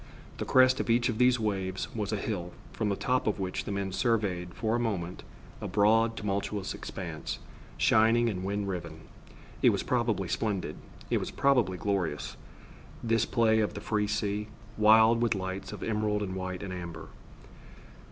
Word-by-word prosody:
The - - -2
crest 130 0 +5
of - - -2
each 120 +2 +3
of 110 -1 -2
these 125 -1 +4
waves 95 -3 -2
was 105 -3 -2
a - - +1
hill, 90 -5 -4 0.2
from 110 -2 -1
the 100 - +1
top 125 +4 0
of 105 - 0
which 95 -1 -3
the - - -4
men 100 -1 -2
surveyed, 95 -6 0
for 110 0 0
a - - +1
moment, 95 -7 -2 0.4
a - - -3
broad 115 +2 +3
tumultuous 100 -1 -2
expanse, - - -5 0.4
shining 115 +2 +4
and 95 -5 -2
wind 100 +1 -2
riven. 85 -4 -5 0.6
It - - +7
was - - 0
probably 115 -6 0
splendid. 100 +1 -2 0.3
It - - +3
was - - -4
probably 125 -10 +2
glorious, 90 -6 -2 0.7
this 115 -1 +2
play 110 -2 +3
of 105 - 0
the - - -4
free 105 -1 0
sea, 105 0 -1 0.3
wild 110 +2 +6
with 115 -2 +2
lights 95 0 -4
of - - -7
emerald 105 -1 0
and 95 -2 -4
white 95 0 -4
and 95 -2 -5
amber. 85 -3 -7
105 Hz, 170 wpm, -29 LUFS, 95-115 Hz, 0.7 s, It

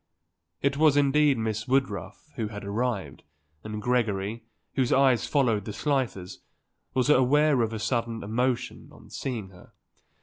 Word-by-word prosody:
It 140 0 +1
was 150 -2 +4
indeed 145 -1 +4
Miss 110 -1 -2
Woodruff 130 +3 -2
who 115 -5 -2
had 105 -1 -8
arrived 100 - -2 0.4
and 110 0 -5
Gregory, 110 -2 -1 0.3
whose 130 -3 0
eyes 135 -3 +3
followed 115 -8 +1
the 105 - -5
Slifers', 125 -10 -2 0.6
was 130 0 +2
aware 145 +1 +4
of 115 -1 0
a 110 - -4
sudden 115 0 -2
emotion 125 +4 -2
on - - -17
seeing 115 -8 -4
her. 90 -2 -17
120 Hz, 140 wpm, -27 LUFS, 105-135 Hz, 0.6 s, was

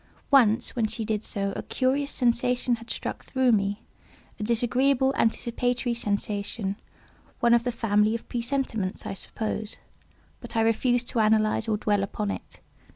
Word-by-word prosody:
Once, 240 -4 +4
when 230 -3 +1
she 220 +1 -3
did 215 -1 -1
so, 200 -1 -3
a - - -3
curious 275 +2 0
sensation 245 0 +1
had 230 +1 -13
struck - - -4
through 260 -2 +2
me—a 205 +1 -4
disagreeable 255 +4 +2
anticipatory 240 +1 0
sensation—one 205 +1 -2
of 235 -1 +4
the 245 - 0
family 215 -1 +2
of 230 - -7
presentiments, 235 -5 -2
I - - -3
suppose—but 215 +3 -7
I 225 - +3
refused 240 +2 +2
to 235 - -1
analyze 215 +1 +3
or 215 -1 +1
dwell 205 -1 +1
upon 200 +1 -2
it. - - -8
230 Hz, 140 wpm, -26 LUFS, 210-245 Hz, -, Once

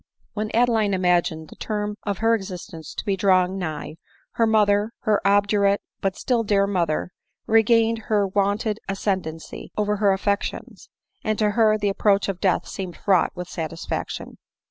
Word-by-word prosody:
When 215 0 -3
Adeline 225 -4 +3
imagined 175 -3 +1
the - - -12
term 210 -1 -3
of 200 -2 -3
her 230 - +5
existence 180 -6 -5
to - - -5
be 200 -2 +1
drawing 185 -1 +2
nigh, 155 -3 -5 0.3
her 230 - +2
mother, 210 0 +3
her 210 -1 +2
obdurate 200 0 +3 0.2
but 195 -1 0
still 245 -3 +1
dear 200 -2 +2
mother, 180 -4 -1 0.3
regained 225 +1 +3
her 210 -2 +2
wonted 205 +2 0
ascendancy 190 -5 -3
over 210 0 +1
her 200 -1 +3
affections; 200 +1 -2 0.3
and 215 -1 0
to 210 -1 +2
her 215 -1 +3
the 205 -1 0
approach 200 0 +2
of 185 -2 -4
death 190 -3 +1
seemed 185 -3 -6
fraught 190 -4 +2
with 180 -1 -6
satisfaction. 165 -1 -5
200 Hz, 155 wpm, -23 LUFS, 185-215 Hz, 0.3 s, her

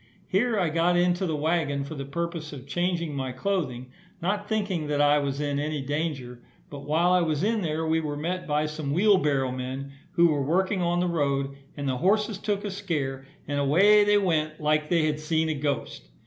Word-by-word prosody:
Here 225 +4 +1
I 175 -3 +1
got 170 +2 +2
into 180 +1 +2
the 160 - -1
waggon 150 -2 0
for 140 - -7
the 140 -2 -5
purpose 165 +1 -4
of 130 -3 -9
changing 170 0 -1
my 130 -2 -3
clothing, 130 -5 -2 0.3
not 205 +4 -2
thinking 200 -8 -1
that 145 -1 -1
I 145 0 +5
was 140 -1 -2
in 145 -1 -1
any 150 0 -2
danger; 135 -4 -3 0.3
but 140 -1 -8
while 165 +4 +3
I 180 0 +4
was 160 -1 0
in 220 +1 +1
there 160 -2 -1
we 160 0 +2
were 150 -2 -3
met 180 +4 -3
by 150 0 +1
some 155 -2 -3
wheel 200 +4 +5
barrow 135 -5 +1
men, 130 +2 -5 0.2
who 170 0 +5
were 145 -2 +1
working 185 +7 +1
on 175 0 +1
the 180 - +1
road, 140 -4 0 0.2
and 140 -1 -3
the 130 -1 0
horses 205 - +1
took 205 0 -2
a 205 - -3
scare 145 -9 -3 0.2
and 145 0 -1
away 195 +10 +5
they 205 0 +4
went, 155 -6 0
like 150 0 +1
they 170 -3 +3
had 150 -1 -1
seen 160 +1 0
a - - +1
ghost. 140 - -3
155 Hz, 210 wpm, -26 LUFS, 145-180 Hz, 0.3 s, I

